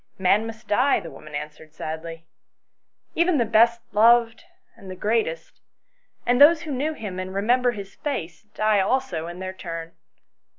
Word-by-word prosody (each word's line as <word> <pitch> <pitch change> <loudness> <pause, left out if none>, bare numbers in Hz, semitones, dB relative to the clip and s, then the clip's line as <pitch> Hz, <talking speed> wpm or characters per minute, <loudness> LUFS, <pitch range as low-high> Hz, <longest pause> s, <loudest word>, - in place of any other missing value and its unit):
" - - -43
Man 215 +3 +2
must 225 +1 -10
die," 255 +6 +3
the 170 -5 -9
woman 150 -1 -11
answered 155 +1 -8
sadly; 165 +1 -7 0.4
" - - -52
even 340 -1 +2
the 240 - +2
best 230 +2 +3
loved 230 +1 +4 0.3
and 190 - -13
the 185 - -6
greatest, 235 - -2 0.6
and 245 +2 +2
those 305 +2 +7
who 310 - -6
knew 285 +4 -1
him 200 -9 -6
and 185 +1 -6
remember 245 +5 +2
his 200 -2 -9
face 170 - -5
die 215 -1 +2
also 190 -6 -1
in 175 +1 -8
their 185 0 -5
turn. 165 -3 -7
215 Hz, 170 wpm, -24 LUFS, 175-245 Hz, 0.6 s, those